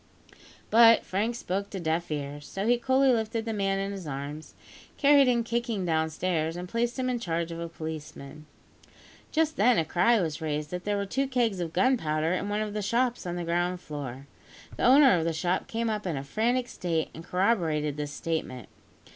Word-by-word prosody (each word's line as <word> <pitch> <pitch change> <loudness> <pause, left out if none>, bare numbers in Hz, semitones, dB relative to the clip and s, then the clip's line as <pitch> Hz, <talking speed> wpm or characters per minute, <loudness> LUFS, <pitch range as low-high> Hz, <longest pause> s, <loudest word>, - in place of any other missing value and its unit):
But 230 0 +7
Frank 215 +5 -1
spoke 200 -2 -3
to 195 - -5
deaf 165 0 -1
ears; 145 -1 -5
so 195 +1 -4
he 240 +1 +3
coolly 265 +2 +3
lifted 225 0 -1
the 225 - -2
man 195 -2 0
in 195 0 -2
his 190 -5 -7
arms, 145 +2 -6 0.4
carried 280 -1 +6
him 240 -2 +2
kicking 230 -4 -2
downstairs, 160 0 0
and 180 +1 -5
placed 235 +5 -1
him 255 -1 -1
in 250 -1 -1
charge 170 -4 -2
of 165 - -6
a 170 0 -5
policeman. 155 -2 -8 0.8
Just 315 0 +1
then, 240 +3 +4
a 160 - +2
cry 185 +9 +3
was 160 -4 -2
raised 150 -1 -3
that 180 0 -5
there 205 0 0
were 200 - -1
two 270 +7 -1
kegs 240 -7 0
of 170 -2 -3
gunpowder 165 -6 +1
in 200 +2 -2
one 210 +1 -1
of 210 -1 -3
the 210 - -2
shops 235 +1 0
on 175 - -3
the 175 - -3
ground 175 +2 0
floor. 140 -5 -7 0.5
The - - -1
owner 265 -2 +7
of - - -1
the 165 0 0
shop 175 +3 -1
came 230 +1 -2
up 210 -3 -2
in 165 -5 -2
a 135 - -4
frantic 240 - 0
state, 165 -8 -2
and 165 - -9
corroborated 165 -6 0
this 145 -1 -4
statement. 145 - -4
185 Hz, 200 wpm, -28 LUFS, 160-230 Hz, 0.8 s, But